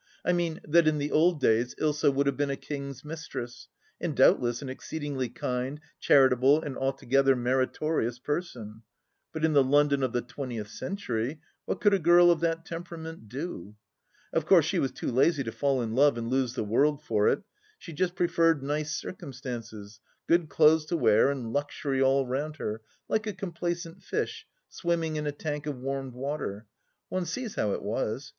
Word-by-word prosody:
I - - +3
mean, 170 -2 -1
that 165 +1 +4
in 155 -1 +3
the 145 0 -2
old 165 +1 +3
days 120 -1 +2
Ilsa 150 -2 +2
would 140 +1 +1
have 140 - +1
been 145 -1 0
a 140 - -1
king's 140 -1 -7
mistress, 150 -6 -7 0.3
and - - -3
doubtless 120 +2 +4
an - - -6
exceed 145 +4 -6
ingly 135 -4 -2
kind, 125 +3 -3 0.2
charitable, 135 +1 +5
and 140 -3 -5
altogether 135 0 +2
meritorious 130 +1 0
person; 125 -7 -5 0.5
but 160 0 -1
in 160 - +1
the 140 -2 +6
London 140 +1 +3
of 130 -2 0
the 120 - -1
twentieth 120 -4 -6
century, 135 - -3 0.3
what - - -2
could 205 -1 +4
a 195 - +3
girl 175 +1 +6
of 170 - +1
that 165 0 -1
temperament 165 - -8
do? 125 - -6 0.6
Of - - 0
course - - +6
she - - 0
was 135 - 0
too - - -4
lazy 140 +4 +3
to 115 - -4
fall 135 -2 0
in 110 -1 -3
love 140 0 +4
and 115 +1 -4
lose 130 -2 0
the - - -1
world 145 +8 +1
for 105 -6 +1
it; 210 - +1 0.3
she 170 - -10
just 180 +3 -1
preferred 165 -4 +2
nice 150 +2 -2
circumstances, 120 - -7 0.3
good 170 -2 +2
clothes 155 0 +4
to 170 - 0
wear 110 -3 +4
and 125 -5 -4
luxury 145 -1 -1
all 135 0 +3
round 145 +5 -3
her, 110 -6 -4 0.3
like 220 0 0
a 210 - -2
complacent 175 -1 -4
fish 445 0 -3 0.2
swimming 165 -3 -1
in 150 0 -2
a - - 0
tank 150 0 -5
of 145 -3 -3
warmed 135 0 -4
water. 125 -6 -4 0.4
One 185 -2 -2
sees 225 +6 -4
how 105 - 0
it - - -4
was. 110 +5 -2
140 Hz, 185 wpm, -28 LUFS, 125-160 Hz, 0.6 s, the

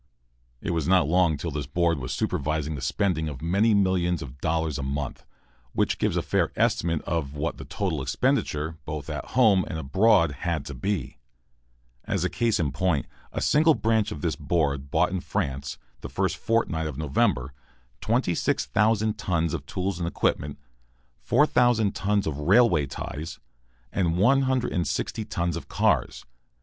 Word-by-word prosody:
It - - -2
was 80 -3 -1
not 90 -4 +4
long 85 -2 +3
till 85 +3 -4
this 75 0 -4
board 85 +1 +1
was 65 - -5
supervising 75 +1 -1
the 70 - -5
spending 80 +2 0
of 70 -4 -7
many 100 - +2
millions 90 -4 +1
of 70 0 -11
dollars 80 -3 0
a - - -2
month, 70 +1 -4 0.5
which - - 0
gives - - +1
a - - 0
fair - - +1
estimate 85 -2 +1
of 75 -4 -2
what 75 +3 -2
the - - -8
total 90 -8 -2
expenditure, 75 +4 0
both 75 0 -5
at 75 - -4
home 105 -7 +5
and 80 - -4
abroad, 85 +3 +3
had 85 -4 -2
to 70 - -6
be. 90 +4 -3 0.9
As - - -1
a - - 0
case 115 -2 +1
in 75 -5 0
point, 80 0 0 0.3
a - - -3
single 155 +1 +4
branch 110 -2 +1
of 75 - -6
this - - 0
board 70 -5 -1
bought 85 +5 +2
in 95 - -1
France, 70 -4 -3 0.2
the - - -7
first - - 0
fortnight 85 -9 0
of 75 -4 -6
November, 70 -3 0 0.5
26,000 110 - +1
tons 85 -4 0
of 70 -4 -4
tools 95 -1 -2
and 85 - -1
equipment, 75 -3 -1 0.6
4,000 120 -7 +3
tons 100 0 0
of 75 -2 -3
railway 90 - +4
ties, 80 +4 -6 0.5
and 85 -3 +1
160 125 -3 +1
tons 85 -5 -2
of 85 - -6
cars. - - 0
85 Hz, 160 wpm, -26 LUFS, 75-100 Hz, 0.9 s, home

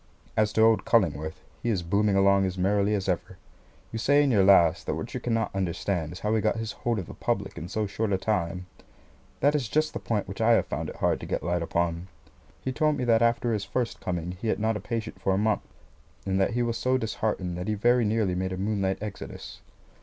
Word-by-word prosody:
As 105 -1 +2
to 110 - +4
old 115 -1 +4
Cullingworth, 80 - +1 0.2
he 120 - -1
is 95 -6 0
booming 100 +3 +2
along 100 0 +4
as 95 0 -4
merrily 100 +3 +2
as 95 -2 -2
ever. 90 -2 -2 0.5
You 115 - -4
say 145 +5 +4
in 140 - +2
your 100 -5 +4
last, 95 -4 +5
that - - 0
what - - -6
you - - -2
cannot 115 -2 -1
understand 90 -3 -2
is 90 - -9
how 105 +1 0
he 110 - +2
got 110 - +1
his 110 -1 -3
hold 120 +1 -2
of 95 - -3
the - - -10
public - - -2
in 80 - -6
so 110 +2 -1
short 105 +1 -2
a 95 - +2
time. 90 -3 -1 0.8
That 145 +2 +4
is 140 -7 -1
just 155 +3 +1
the - - -3
point 105 -3 -2
which 95 +4 -6
I 115 +1 +5
have - - +3
found - - -4
it - - -8
hard - - +1
to - - -8
get - - -2
light 85 0 0
upon. 85 +1 -1 0.6
He 130 - -1
told 150 +2 +1
me 130 - -2
that 115 -2 +3
after 115 0 +2
his 105 -2 -1
first 120 +2 -2
coming 90 -1 -3
he 115 - -2
had - - +1
not 110 +1 +1
a - - -2
patient 110 +2 -5
for 95 - +1
a - - 0
month, 105 0 +1 0.6
and 95 0 +1
that 95 - +1
he 120 - +2
was 115 -1 -1
so 130 +2 +2
disheartened 105 -6 -2
that 90 - -4
he 110 - 0
very 120 +3 +3
nearly 105 -3 +1
made 95 +1 -2
a - - -4
moonlight 95 -1 0
exodus. 105 -2 -8
105 Hz, 245 wpm, -27 LUFS, 95-115 Hz, 0.8 s, last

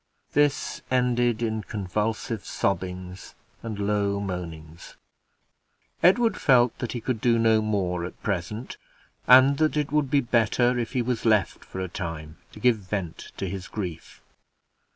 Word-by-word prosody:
This 145 -2 +1
ended 120 -2 +1
in 110 -1 -1
convulsive 105 +2 -3
sobbings 90 0 -3 0.3
and 110 -3 -5
low 100 -1 0
moanings. 85 -4 -7 1.1
Edward 225 +3 +4
felt 125 -3 +4
that 120 - -3
he 120 - -3
could 115 -1 -3
do 120 -1 +3
no 110 -1 +4
more 95 -5 -1
at 90 - -10
present, 105 +5 -3 0.5
and 130 +2 +7
that 155 -1 +2
it 150 -2 -1
would 150 -2 +1
be 145 - +3
better 120 0 +2
if 120 +1 -3
he 125 -2 +1
was 120 -2 -2
left 110 -5 +2
for 95 - -8
a 95 - -2
time 80 -2 -6
to - - -12
give 120 0 +3
vent 95 -4 -5
to - - -3
his 95 -1 -5
grief. 90 -7 -7
110 Hz, 150 wpm, -25 LUFS, 95-125 Hz, 1.1 s, and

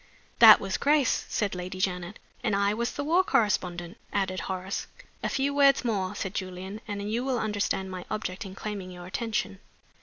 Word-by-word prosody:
'" - - -32
"That - - +10
was - - -2
Grace," 290 -3 +2
said 205 -3 0
Lady 180 +1 -5
Janet. 180 0 -2 0.3
"And 215 -4 +1
I 200 +1 +2
was 235 +2 -2
the - - -3
war 340 +6 +3
correspondent," 180 - 0
added 190 -2 -1
Horace. 190 +1 -4 0.3
"A - - -1
few 275 +1 0
words 275 -2 +4
more," 200 -4 -1
said 195 -1 -4
Julian, 190 +2 -5
"and 205 0 -4
you 235 +3 0
will 260 -2 0
understand 205 -3 -1
my 185 -1 -6
object 215 -2 -3
in 190 -2 -9
claiming 200 -3 -5
your 180 -1 -9
attention." 200 - -2
200 Hz, 185 wpm, -28 LUFS, 185-230 Hz, 0.3 s, That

